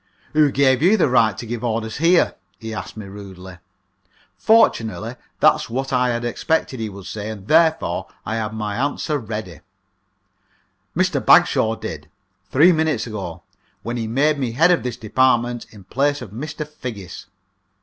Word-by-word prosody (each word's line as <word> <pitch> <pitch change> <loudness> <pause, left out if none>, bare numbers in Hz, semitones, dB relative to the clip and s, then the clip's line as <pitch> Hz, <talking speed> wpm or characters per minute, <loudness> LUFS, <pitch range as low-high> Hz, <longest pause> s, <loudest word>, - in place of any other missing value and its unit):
"Who 150 -1 +4
gave 130 -1 +3
you 190 +7 +5
the 165 - +3
right 110 -5 +3
to - - -6
give 115 0 -5
orders 110 -1 -2
here?" 170 +4 +3 0.2
he 110 +3 -7
asked 110 - -7
me, 105 - -7
rudely. 95 -2 -11 0.8
Fortunately, 115 - +2 0.3
that - - +7
was - - -7
what 135 +3 -3
I 125 0 +2
had 120 0 -2
expected 130 +1 -1
he 110 -1 -3
would 100 -1 -11
say, 105 0 -5
and 105 -2 -8
therefore 160 - +2 0.2
I 110 +2 -2
had 110 -1 -2
my 105 -1 -4
answer 145 +2 -1
ready: 105 - -6 1.4
"Mr. - - +1
Bagshaw 110 0 +4
did, 90 -10 -7 0.4
three 160 +7 +6
minutes 160 -7 0
ago, 100 -7 -6 0.4
when 120 +1 -3
he 115 -2 -3
made 145 +6 +1
me 125 -4 -2
head 165 +8 +4
of 175 - +3
this 125 -2 -4
department 120 +1 +1
in 105 -3 -15
place 145 +8 0
of 105 - -10
Mr. 150 +6 -6
Figgis." 110 - -8
120 Hz, 165 wpm, -21 LUFS, 110-145 Hz, 1.4 s, that